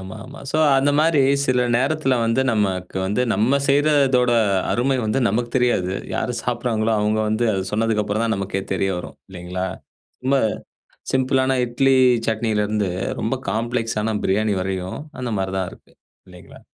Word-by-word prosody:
ஆமாமா. 110 +8 -10
ஸோ - - -1 0.2
அந்த 135 +2 +3
மாதிரி 160 -2 +3 0.3
சில 125 -1 +2
நேரத்தில 135 +1 +1
வந்து 115 +3 +1
நமக்கு 95 -4 -1
வந்து 105 +6 0
நம்ம 125 +6 +2
செய்கிறதோட 140 -3 +3 0.4
அருமை 130 +3 +1
வந்து 110 +4 0
நமக்கு 120 +1 -1
தெரியாது. 120 -8 +1 0.2
யாரு 125 - -2
சாப்பிடறாங்களோ, 120 -2 -1
அவங்க 105 +1 +1
வந்து 110 +2 0
அத 95 -1 -2
சொன்னதுக்கு 110 0 +1
அப்புறம் 105 +2 -1
தான் 110 -1 +1
நமக்கே 95 0 -3
தெரிய 95 +1 0
வரும். - - -9
இல்லைங்களா? 90 0 -4 0.6
ரொம்ப 135 +1 +3 0.8
சிம்பிளான 130 0 +2
இட்லி 135 +3 +2 0.3
சட்னியிலிருந்து 105 -2 0 0.3
ரொம்ப 115 +4 -1 0.2
காம்ப்ளெக்ஸான 110 -1 -1
பிரியாணி 105 +2 +1
வரையும் 95 -1 -4 0.2
அந்த 125 -2 -3
மாதிரி 95 0 -2
தான் 95 -1 -2
இருக்கு. - - -18 0.4
இல்லைங்களா? - - -14
115 Hz, 145 wpm, -21 LUFS, 100-130 Hz, 0.8 s, அந்த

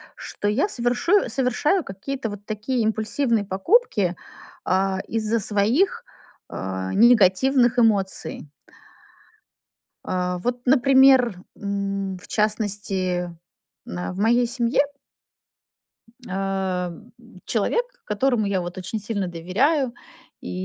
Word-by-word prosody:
что 205 - -5
я 255 - +1
совершу 245 +11 +1
совершаю 270 - +1
какие-то 225 +5 -5
вот 205 0 -9
такие 220 +4 -2
импульсивные 220 +1 0
покупки, 195 - +2 0.5
а, 190 +1 +1
из-за 225 0 0
своих, 215 - +1 0.4
э, 95 0 -4
негативных 240 +3 +4
эмоций. 195 -9 +1 1.6
А, 180 0 -1
вот, 245 +6 -2
например, 260 -4 +5 0.2
м, 200 -1 -3
в - - -13
частности, 195 -5 -1 0.5
на 90 - -5
в 185 - -7
моей 240 +3 +3
семье 240 +1 +1 1.5
Э, 190 -1 -2
м, 175 +8 -12 0.3
человек, 360 - 0 0.2
которому 225 +1 +1
я, 190 -2 0
вот, 175 +1 -7
очень 185 +4 -4
сильно 205 -2 -3
доверяю, 235 - 0 0.5
и - - -7
210 Hz, 100 wpm, -23 LUFS, 190-245 Hz, 1.6 s, например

